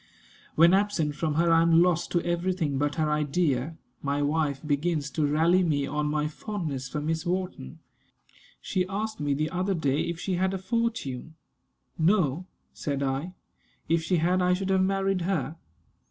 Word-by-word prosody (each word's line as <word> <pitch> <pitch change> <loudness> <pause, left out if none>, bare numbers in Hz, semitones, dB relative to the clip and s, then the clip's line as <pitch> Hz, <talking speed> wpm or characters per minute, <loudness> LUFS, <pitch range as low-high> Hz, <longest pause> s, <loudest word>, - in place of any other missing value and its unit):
When 170 +3 +6
absent 195 -7 +1
from 150 0 -2
her 170 +1 +3
I 165 0 +5
am 165 0 +5
lost 175 -1 +1
to 175 - 0
every 175 +2 0
thing 150 -7 -1
but 145 0 0
her 155 -2 +1
idea. 150 -1 0 0.2
My 145 0 -1
wife 145 -2 0
begins 150 0 0
to 155 -2 +1
rally 165 +5 +3
me 150 -5 +1
on 150 +1 -1
my 150 0 0
fondness 150 - -5
for 150 - -3
Miss 160 +2 -2
Wharton. 180 - -3 0.8
She 185 -1 -1
asked 215 +2 -3
me 145 -1 0
the 155 +2 -1
other 185 +2 0
day 145 -3 0
if 170 -1 -4
she 185 0 -2
had 190 +1 +1
a - - -1
fortune. 190 - -2 0.6
"No," 175 -1 +2 0.3
said 140 -1 -3
I; 135 +7 -2 0.5
"if 165 0 +2
she 175 +2 +1
had 180 +3 +2
I 180 0 +3
should 195 +1 -2
have 190 0 +3
married 195 0 +1
her." 170 -3 -2
165 Hz, 175 wpm, -27 LUFS, 150-185 Hz, 0.8 s, When